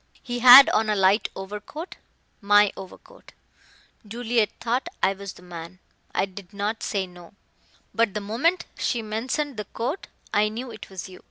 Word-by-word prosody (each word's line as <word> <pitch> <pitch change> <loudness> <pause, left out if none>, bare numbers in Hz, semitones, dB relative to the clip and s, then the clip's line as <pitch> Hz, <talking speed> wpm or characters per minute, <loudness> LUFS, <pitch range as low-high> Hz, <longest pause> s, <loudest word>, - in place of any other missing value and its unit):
He 245 -2 -4
had 255 +3 +11
on 215 0 +1
alight 200 0 +3
overcoat 210 - -8 0.4
my 205 0 +4
overcoat. 195 - -13 0.7
Juliet 230 0 0
thought 245 +8 -1
I 195 - +4
was 195 0 -8
the - - -17
man. 175 0 -9 0.3
I - - 0
did 195 0 -12
not 210 +2 -2
say 195 -2 -2
no. 180 +1 -15 0.6
But 225 -3 +1
the - - 0
moment 240 - 0
she 235 -2 -1
mentioned 245 +5 -3
the 210 - -4
coat 255 - -4 0.3
I 210 +1 +3
knew 240 +3 -6
it - - -10
was 190 -2 -7
you. 185 -1 -13
210 Hz, 160 wpm, -24 LUFS, 195-245 Hz, 0.7 s, had